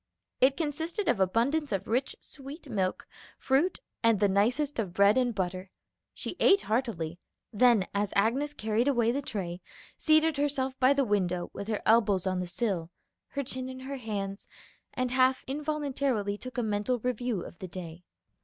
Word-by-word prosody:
It 265 Hz, +2 st, +4 dB
consisted 325 Hz, +6 st, -2 dB
of 200 Hz, -, +2 dB
abundance 240 Hz, -, +1 dB
of 195 Hz, -3 st, -2 dB
rich 250 Hz, +4 st, 0 dB
sweet 290 Hz, +3 st, -9 dB
milk, 190 Hz, -6 st, -1 dB, 0.3 s
fruit, 280 Hz, +8 st, +2 dB, 0.2 s
and 230 Hz, -3 st, +4 dB
the 205 Hz, -, +4 dB
nicest 240 Hz, +9 st, +1 dB
of 190 Hz, -5 st, -3 dB
bread 200 Hz, +2 st, +5 dB
and 250 Hz, -3 st, +1 dB
butter. 185 Hz, 0 st, -3 dB, 0.4 s
She -, -, -6 dB
ate 400 Hz, 0 st, +5 dB
heartily; 205 Hz, -9 st, -2 dB, 0.3 s
then 230 Hz, -3 st, +5 dB
as 200 Hz, 0 st, 0 dB
Agnes 265 Hz, +9 st, +1 dB
carried 220 Hz, +2 st, 0 dB
away 240 Hz, -4 st, +3 dB
the 275 Hz, +4 st, -1 dB
tray, 185 Hz, -8 st, -4 dB, 0.4 s
seated 315 Hz, -1 st, +3 dB
herself 275 Hz, -2 st, 0 dB
by 260 Hz, +1 st, +5 dB
the 280 Hz, -1 st, +2 dB
window 180 Hz, -5 st, 0 dB
with 200 Hz, -, -6 dB
her 215 Hz, -2 st, -2 dB
elbows 210 Hz, -5 st, +4 dB
on 185 Hz, -1 st, 0 dB
the 180 Hz, -, -3 dB
sill, 175 Hz, -4 st, -2 dB, 0.4 s
her 280 Hz, -, -3 dB
chin 260 Hz, 0 st, -3 dB
in 260 Hz, 0 st, -8 dB
her 275 Hz, +1 st, -5 dB
hands, 200 Hz, -4 st, -4 dB, 0.5 s
and 255 Hz, -1 st, -1 dB
half 255 Hz, 0 st, +3 dB
involuntarily 280 Hz, -7 st, -1 dB
took 255 Hz, +4 st, -9 dB
a 245 Hz, -, +1 dB
mental 210 Hz, +3 st, 0 dB
review 245 Hz, -4 st, -2 dB
of -, -, -11 dB
the 185 Hz, -, -6 dB
day. 175 Hz, -1 st, -8 dB
235 Hz, 170 wpm, -29 LUFS, 200-270 Hz, 0.5 s, bread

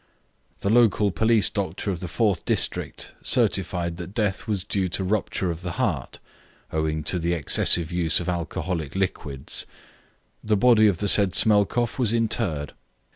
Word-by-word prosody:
The 100 Hz, -, 0 dB
local 110 Hz, -3 st, +3 dB
police 110 Hz, +2 st, +2 dB
doctor 100 Hz, 0 st, -3 dB
of 90 Hz, -, -4 dB
the 90 Hz, -, -6 dB
fourth 100 Hz, -1 st, 0 dB
district -, -, -2 dB
certified 85 Hz, -1 st, 0 dB
that 90 Hz, +3 st, -8 dB
death 105 Hz, -4 st, -1 dB
was 100 Hz, -4 st, -1 dB
due 95 Hz, -2 st, -1 dB
to 90 Hz, +3 st, -1 dB
rupture 95 Hz, -2 st, -1 dB
of 85 Hz, 0 st, -7 dB
the 90 Hz, -2 st, -5 dB
heart, 95 Hz, -, -2 dB, 0.6 s
owing 80 Hz, 0 st, -1 dB
to 90 Hz, +4 st, 0 dB
the 85 Hz, +1 st, 0 dB
excessive 85 Hz, +1 st, +3 dB
use 85 Hz, -2 st, +1 dB
of 90 Hz, -, -6 dB
alcoholic 85 Hz, -3 st, -3 dB
liquids. 75 Hz, -8 st, -3 dB, 0.8 s
The 105 Hz, -1 st, +1 dB
body 110 Hz, -1 st, +5 dB
of 100 Hz, -5 st, +1 dB
the 100 Hz, -, -2 dB
said 100 Hz, -2 st, +3 dB
Smelkoff 110 Hz, +3 st, +2 dB
was 115 Hz, -3 st, +2 dB
interred. 105 Hz, -10 st, -1 dB
95 Hz, 155 wpm, -24 LUFS, 85-105 Hz, 0.8 s, body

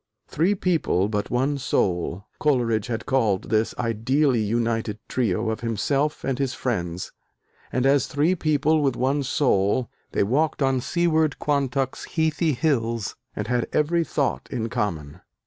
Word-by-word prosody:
"Three 180 Hz, +7 st, +1 dB
people 160 Hz, -, +1 dB
but 105 Hz, -1 st, -2 dB
one 135 Hz, +3 st, 0 dB
soul," 90 Hz, -5 st, -1 dB
Coleridge 120 Hz, -7 st, +1 dB
had 115 Hz, -2 st, -3 dB
called 110 Hz, -8 st, +1 dB
this 110 Hz, 0 st, +1 dB
ideally 120 Hz, +4 st, +1 dB
united 115 Hz, 0 st, -1 dB
trio 110 Hz, -3 st, 0 dB
of 110 Hz, -, -3 dB
himself 135 Hz, +6 st, -1 dB
and 135 Hz, -1 st, -1 dB
his 135 Hz, -2 st, -1 dB
friends; 90 Hz, -7 st, -3 dB, 0.6 s
and 125 Hz, +1 st, 0 dB
as 140 Hz, 0 st, +3 dB
"three 150 Hz, +5 st, +2 dB
people 155 Hz, -2 st, +2 dB
with 135 Hz, -4 st, +1 dB
one 135 Hz, +3 st, +1 dB
soul," 125 Hz, -4 st, +1 dB, 0.2 s
they -, -, +2 dB
"walked 145 Hz, +7 st, +1 dB
on 135 Hz, -1 st, +2 dB
seaward 160 Hz, 0 st, +1 dB
Quantock's 135 Hz, -2 st, -1 dB
heathy 160 Hz, 0 st, 0 dB
hills," 115 Hz, -6 st, 0 dB, 0.2 s
and 105 Hz, -, -3 dB
had 120 Hz, 0 st, 0 dB
every 170 Hz, +3 st, +2 dB
thought 145 Hz, -3 st, -1 dB
in 115 Hz, -2 st, -2 dB
common. 90 Hz, -9 st, -3 dB
130 Hz, 145 wpm, -24 LUFS, 110-145 Hz, 0.6 s, as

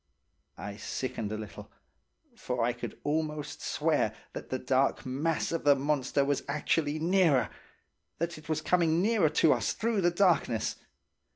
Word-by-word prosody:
I 100 Hz, 0 st, -7 dB
sickened 115 Hz, -3 st, -4 dB
a 110 Hz, -, -2 dB
little, 110 Hz, 0 st, -9 dB, 0.6 s
for 125 Hz, -, -2 dB
I 120 Hz, +1 st, +1 dB
could 120 Hz, -, -7 dB
almost 150 Hz, 0 st, -2 dB
swear -, -, 0 dB, 0.2 s
that -, -, -7 dB
the -, -, -1 dB
dark -, -, +1 dB
mass 145 Hz, +5 st, -1 dB
of 165 Hz, -, -2 dB
the 145 Hz, -1 st, +6 dB
monster 140 Hz, 0 st, 0 dB
was 140 Hz, -1 st, 0 dB
actually 150 Hz, +1 st, 0 dB
nearer–that 170 Hz, 0 st, -1 dB
it 155 Hz, -, -16 dB
was 155 Hz, -1 st, 0 dB
coming 170 Hz, -2 st, +2 dB
nearer 200 Hz, -4 st, +3 dB
to 160 Hz, +1 st, +4 dB
us -, -, -1 dB
through 225 Hz, -2 st, 0 dB
the 175 Hz, -, +4 dB
darkness. 170 Hz, -, +1 dB
150 Hz, 150 wpm, -30 LUFS, 135-170 Hz, 0.6 s, the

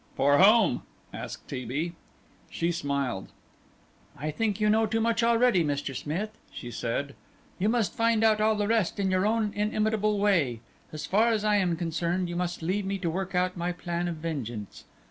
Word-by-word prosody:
"For 145 Hz, +1 st, +4 dB
whom?" 200 Hz, -, +5 dB, 0.3 s
asked -, -, -7 dB
T. 125 Hz, -, -5 dB
B. 150 Hz, +8 st, -3 dB, 0.6 s
She 170 Hz, +1 st, -1 dB
smiled. 140 Hz, -, -2 dB, 0.9 s
"I 155 Hz, +2 st, -3 dB
think 210 Hz, +4 st, -1 dB
you 210 Hz, -, +2 dB
know 220 Hz, +1 st, +3 dB
too 225 Hz, +2 st, 0 dB
much 230 Hz, +1 st, +1 dB
already, 235 Hz, -5 st, +4 dB
Mr. 145 Hz, -2 st, -2 dB
Smith," 180 Hz, -, -3 dB, 0.2 s
she 120 Hz, -, -8 dB
said; 130 Hz, +5 st, -3 dB, 0.5 s
"you 205 Hz, +4 st, +2 dB
must 225 Hz, -6 st, +1 dB
find 230 Hz, -1 st, +2 dB
out 215 Hz, -1 st, +4 dB
all 215 Hz, 0 st, +3 dB
the 205 Hz, -1 st, 0 dB
rest 220 Hz, -4 st, +1 dB
in 190 Hz, -1 st, +1 dB
your 185 Hz, +2 st, +2 dB
own 220 Hz, -1 st, 0 dB
inimitable 215 Hz, 0 st, 0 dB
way; 170 Hz, -, +2 dB, 0.3 s
so 155 Hz, -, -7 dB
far 215 Hz, +4 st, +3 dB
as 215 Hz, -2 st, 0 dB
I 210 Hz, -1 st, +4 dB
am 180 Hz, -4 st, +1 dB
concerned, 170 Hz, +2 st, -1 dB
you 175 Hz, -, -4 dB
must 175 Hz, -1 st, -3 dB
leave 190 Hz, +5 st, 0 dB
me 195 Hz, 0 st, -1 dB
to 175 Hz, -4 st, -2 dB
work 190 Hz, +2 st, -3 dB
out 180 Hz, 0 st, +1 dB
my 175 Hz, 0 st, -2 dB
plan 175 Hz, 0 st, -3 dB
of 170 Hz, -, -3 dB
vengeance. 125 Hz, -10 st, -5 dB
185 Hz, 185 wpm, -28 LUFS, 160-215 Hz, 0.9 s, whom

